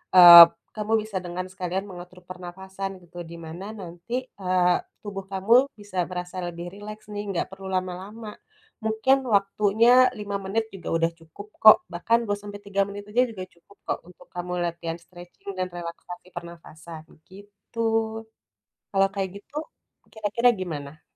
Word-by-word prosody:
eee, 175 -1 +13
b - - -19 0.3
kamu 215 +1 -1
bisa 215 -2 -5
dengan 180 +1 -5
sekalian 185 +1 -3
mengatur 180 0 -11
pernafasan, 190 +1 -7
gitu. 175 0 -16
Di 165 - -11
mana, 170 +4 -8 0.2
nanti, 175 +5 -9 0.2
eee, 180 -2 +2 0.2
tubuh 195 -2 -6
kamu 195 +4 +2 0.3
bisa 205 -2 -10
merasa 180 0 -6
lebih 175 0 -6
rileks, 215 +1 -9
nih. 205 0 -3
Nggak 175 - -1
perlu 195 0 -11
lama-lama. 190 +5 -5 0.6
Mungkin, 220 +5 +3
waktunya 210 +1 +3 0.3
5 205 -1 -3
menit 220 +3 -1
juga 185 -3 -7
udah 165 0 +1
cukup, 165 +6 -12
kok. 215 0 +10 0.2
Bahkan, 205 +7 +2
2 205 - +1
sampai 205 0 -9
3 200 0 -1
menit 205 0 -7
aja, 240 +4 +3
juga 190 -4 -7
cukup, 185 +4 -23
kok, - - +1
untuk 180 0 -17
kamu 180 0 -5
latihan 170 -1 -4
stretching 175 +2 -13
dan 185 0 -1
relaksasi 175 +1 -8
pernafasan, 165 -1 -10 0.3
gitu. 200 +3 -14 1.1
Kalau 195 0 +4
kayak 195 -1 -2
gitu, 205 - -18 0.6
kira-kira 220 +3 +2
gimana? 155 -5 -6
190 Hz, 150 wpm, -25 LUFS, 175-205 Hz, 1.1 s, eee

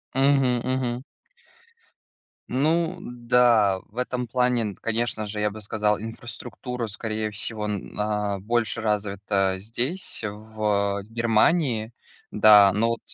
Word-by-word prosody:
Мгм, 135 -3 +3
мгм. 130 -1 -2 1.5
Ну 165 +6 +1
да, 120 - +3
в 110 - -22
этом 125 0 -2
плане, 120 -4 0
конечно 115 -1 -1
же, 105 +1 -5
я 105 0 +1
бы 110 +1 -9
сказал, 105 0 0
инфраструктура, 120 +2 -6
скорее 110 0 -3
всего, 105 0 -1
на 105 0 -2
больше 115 +3 -1
развита 100 -2 0
здесь 120 - -3
в 105 -1 -2
Германии, 115 +1 +2 0.4
да, 105 -2 +7
но 110 +4 +2
вот 115 - -1
110 Hz, 110 wpm, -25 LUFS, 105-125 Hz, 1.5 s, да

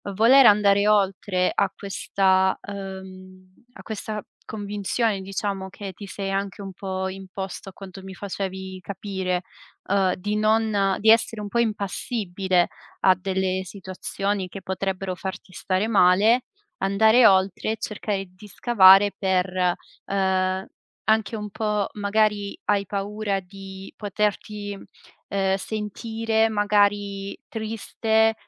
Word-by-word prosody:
voler 245 +5 +7
andare 205 0 +5
oltre 195 -2 +2
a 200 - +2
questa, 190 -1 +1
uhm, 190 -1 -9 0.2
a - - -13
questa 215 0 -5 0.3
convinzione, 205 0 -2
diciamo, 195 0 -3
che 200 0 -8
ti 200 +3 -10
sei 195 -1 -4
anche 195 +1 -3
un 195 -1 -7
po' 190 0 -3
imposto 190 0 -7
a - - -14
quanto 195 0 -10
mi 190 0 -9
facevi 190 -1 -5
capire, 190 -2 -3 0.4
ehm, 190 -2 +2
di 205 +3 -3
non 215 -2 +2
di 220 +1 +6
essere 225 -1 +2
un 205 - -5
po' 235 - 0
impassibile 195 -4 0 0.3
a 190 - +6
delle 190 0 -1
situazioni 190 +1 -3
che 195 +1 -9
potrebbero 190 0 -3
farti 190 0 -7
stare 185 +4 -1
male. 210 +4 +4 0.3
Andare 220 +5 +5
oltre 190 0 +2
e - - -6
cercare 205 -2 -3
di 185 +3 -15
scavare 200 -2 +6
per, 190 -2 +1 0.6
ehm, 190 0 0 0.4
anche 220 +1 +2
un 210 -1 -6
po' 210 -1 -1
magari 205 0 0
hai 200 -1 +1
paura 205 0 -2
di 190 +1 -11
poterti, 205 0 -2 0.5
ehm, 195 -1 +1
sentire 220 +2 -1
magari 205 -1 +1
triste 220 0 0
200 Hz, 120 wpm, -24 LUFS, 190-210 Hz, 0.6 s, voler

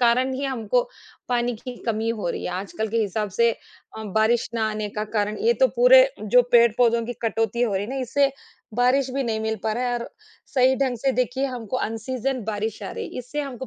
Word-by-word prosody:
कारण 250 +2 +3
ही 275 +2 -3
हमको 270 - 0 0.5
पानी 245 0 0
की 250 +2 -8
कमी 225 0 0
हो 215 -6 -2
रही - - -5
है। - - -2
आजकल 200 +4 -4
के 230 - -2
हिसाब 210 +1 -2
से 235 0 +6
अ, - - -11 0.5
बारिश 220 +3 +1
ना 220 -1 +1
आने 215 -1 -3
का 210 - 0
कारण 210 +1 -1
ये 470 - +5
तो - - +8
पूरे - - +7
जो 245 +4 +5
पेड़-पौधों 235 0 +4
की 245 - -3
कटौती 225 +1 0
हो 215 -5 +1
रही 195 +1 -1
है 225 - -7
ना 270 - -4
इससे 275 +3 +2 0.4
बारिश 250 +2 +3
भी 275 - 0
नहीं 225 -3 -2
मिल 220 0 -1
पा 220 - 0
रहा 245 +3 -2
है 245 - 0
और 235 - -7 0.4
सही 260 -1 +3
ढंग 265 -3 0
से 270 +4 0
देखिए 255 +2 0
हमको 250 -2 -4
अन 225 -2 -2
सीजन 255 +2 -3
बारिश 215 0 -3
आ 195 - -5
रही, - - -5
इससे 250 +4 -4
हमको 260 -3 -6
235 Hz, 225 wpm, -24 LUFS, 220-260 Hz, 0.5 s, तो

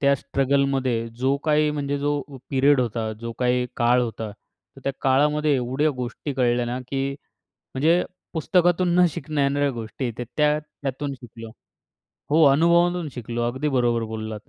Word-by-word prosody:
त्या 140 0 +4
स्ट्रगलमध्ये 135 -4 0
जो 135 +2 +2
काही 150 -1 +3
म्हणजे 145 -1 -2
जो 145 0 0 0.3
पिरियड 140 0 +4
होता 115 -2 -2
जो 115 0 -5
काही 125 0 +1
काळ 120 +1 +3
होता. 110 -2 -4 0.5
तर - - -12
त्या 135 - 0
काळामध्ये 150 +3 +3
एवढ्या 130 +4 +1
गोष्टी 125 +3 -4
कळल्या 120 -2 +1
ना, 120 +2 -3
की 135 0 -1 0.6
म्हणजे 160 +6 +3 0.3
पुस्तकातून 175 +1 +2
न 180 - +7
शिकणं 145 0 -3
येणाऱ्या 140 +1 +2
गोष्टी 120 +1 -4
त्या 125 - -4
त्या 150 0 +3
त्यातून 145 -2 -5
शिकलो 115 -2 -10 0.8
हो, 160 +2 +4
अनुभवांतून 170 +3 +3
शिकलो. 120 -1 -4
अगदी 130 +5 -1
बरोबर 120 -4 +1
बोललात. 110 -1 -6
135 Hz, 150 wpm, -24 LUFS, 120-150 Hz, 0.8 s, न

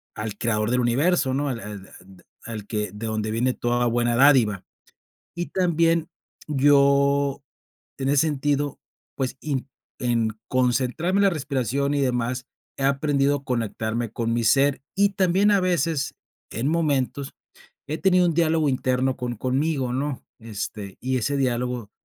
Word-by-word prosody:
al 105 -1 -5
creador 110 -1 0
del 125 - +2
universo, 135 +3 +2
¿no?, 145 0 0
al 120 -3 -3
al 105 -2 -8 0.2
de 95 -1 -18 0.2
al 110 -3 -6
que 105 -3 -2
de 110 +2 -6
donde 110 0 -2
viene 125 +3 +1
toda 120 0 0
buena 120 0 +1
dádiva, 125 -8 +4 0.7
y 175 - -2
también 170 -2 +1 0.4
yo, 140 0 +3 0.6
en 135 0 -1
ese 145 +2 +3
sentido, 145 0 -1 0.4
pues, 130 -1 -2
in 140 -3 -3 0.3
en 115 -3 +1 0.2
concentrarme 130 +9 +1
en - - +4
la 195 - +5
respiración 140 - -1
y 140 - +1
demás, 125 -1 -1 0.3
he 135 - -2
aprendido 140 0 +2
a 140 - -17
conectarme 115 -1 -2
con 115 0 -1
mi 120 -1 0
ser, 135 +3 +3
y 200 0 +4
también 190 +2 +2
a 200 - +4
veces 165 -5 0 0.4
en 120 +6 -2
momentos 145 -4 0 0.5
he 155 +2 -3
tenido 180 -2 +4
un 165 - +1
diálogo 160 -2 +2
interno 130 0 0
con 120 -2 -3
conmigo, 130 +1 -1
¿no? 140 0 -2 0.2
Este, 105 -3 -6
y 130 0 0
ese 140 +4 -1
diálogo 125 -4 -1
130 Hz, 150 wpm, -24 LUFS, 120-145 Hz, 0.7 s, la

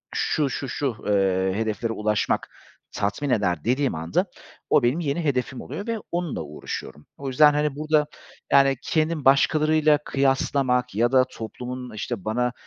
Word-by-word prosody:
şu, 150 -3 +1
şu, 135 0 -4
şu, 130 -5 -2
eee, 95 -2 +2
hedeflere 110 +1 -2
ulaşmak 105 -1 0 0.4
tatmin 105 +8 -2
eder 90 - +1
dediğim 130 - +1
anda 80 +2 0 0.4
o - - +4
benim 125 +7 +2
yeni 165 +1 -1
hedefim 130 -3 -1
oluyor 205 - -7
ve 230 - -1
onunla 175 - -2
uğraşıyorum. 75 0 -7
O 140 - -6
yüzden 150 +3 +5
hani 150 -1 0
burada, 155 0 +1 0.4
yani, 135 -1 +5
kendimi 155 -2 0
başkalarıyla 155 +2 +4
kıyaslamak 135 -3 +1
ya 120 +3 +2
da 130 -1 +5
toplumun 125 +2 -7
işte 105 -2 -5
bana, 125 +3 0
130 Hz, 145 wpm, -24 LUFS, 110-145 Hz, 0.4 s, yüzden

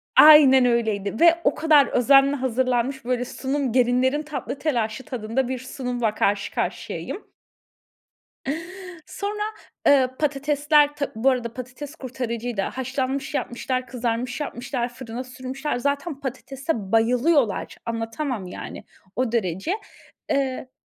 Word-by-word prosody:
Aynen 285 -4 +9
öyleydi 220 -4 0
ve 340 0 +6
o - - +2
kadar 305 -4 +5
özenle 275 +3 +5
hazırlanmış, 255 0 0
böyle 250 0 0
sunum 270 0 -2
gelinlerin 255 +3 +3
tatlı 285 -3 -5
telaşı 245 -5 -1
tadında, 250 -2 -2
bir 260 0 -3
sunumla 250 -3 -2
karşı 200 -1 0
karşıyayım. 415 - -4 1.7
Sonra, 410 +4 -4 0.5
eee, 265 -3 +5
patatesler 295 0 +2
tab 285 - -1
Bu 230 +5 +3
arada, 240 -3 -1
patates 260 +4 -8
kurtarıcıydı. 245 -5 -4
haşlanmış 265 +4 -3
yapmışlar, 255 -1 -2
kızarmış 240 +1 -2
yapmışlar, 245 -3 -3
fırına 245 0 -6
sürmüşler. 260 +2 -4
Zaten 280 +3 -2
patatese 275 +3 -4 0.2
bayılıyorlar, 245 +2 +2
anlatamam 230 -1 -3
yani, 180 - -8 0.3
o 255 -2 0
derece. 190 - -1 0.6
Eee, 270 -3 -1
255 Hz, 110 wpm, -24 LUFS, 240-280 Hz, 1.7 s, Aynen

